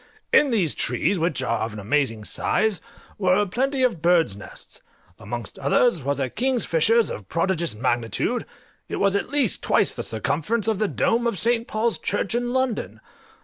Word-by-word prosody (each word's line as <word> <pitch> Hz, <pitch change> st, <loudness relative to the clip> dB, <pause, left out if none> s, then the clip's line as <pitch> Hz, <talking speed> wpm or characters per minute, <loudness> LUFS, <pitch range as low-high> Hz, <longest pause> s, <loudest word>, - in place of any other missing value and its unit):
In 295 Hz, -, +6 dB
these 195 Hz, -, +1 dB
trees, 195 Hz, -, 0 dB
which 165 Hz, -4 st, -1 dB
are 115 Hz, 0 st, 0 dB
of 110 Hz, 0 st, -3 dB
an 105 Hz, -, -7 dB
amazing 115 Hz, 0 st, 0 dB
size, 215 Hz, -, 0 dB, 0.4 s
were 190 Hz, +1 st, +3 dB
plenty 260 Hz, +7 st, -1 dB
of 230 Hz, -11 st, +1 dB
birds' 170 Hz, -, +3 dB
nests; 100 Hz, -, -10 dB, 0.4 s
amongst 120 Hz, -3 st, -6 dB
others 165 Hz, -, +2 dB
was 140 Hz, +1 st, -2 dB
a 135 Hz, -, 0 dB
king 255 Hz, -, 0 dB
fisher's 225 Hz, +4 st, +3 dB
of 100 Hz, -3 st, -8 dB
prodigious 170 Hz, -, 0 dB
magnitude; 120 Hz, -1 st, -1 dB, 0.4 s
it -, -, -3 dB
was 200 Hz, 0 st, +1 dB
at 200 Hz, -, -1 dB
least 280 Hz, -7 st, +1 dB
twice -, -, +2 dB
the -, -, -4 dB
circumference 165 Hz, -, -1 dB
of 220 Hz, -3 st, +1 dB
the 215 Hz, -, +2 dB
dome 235 Hz, +4 st, +1 dB
of 230 Hz, -, -1 dB
St. 230 Hz, +4 st, 0 dB
Paul's 225 Hz, +1 st, 0 dB
Church 205 Hz, 0 st, -2 dB
in 240 Hz, 0 st, -1 dB
London. 260 Hz, -3 st, -1 dB
190 Hz, 175 wpm, -23 LUFS, 140-235 Hz, 0.4 s, In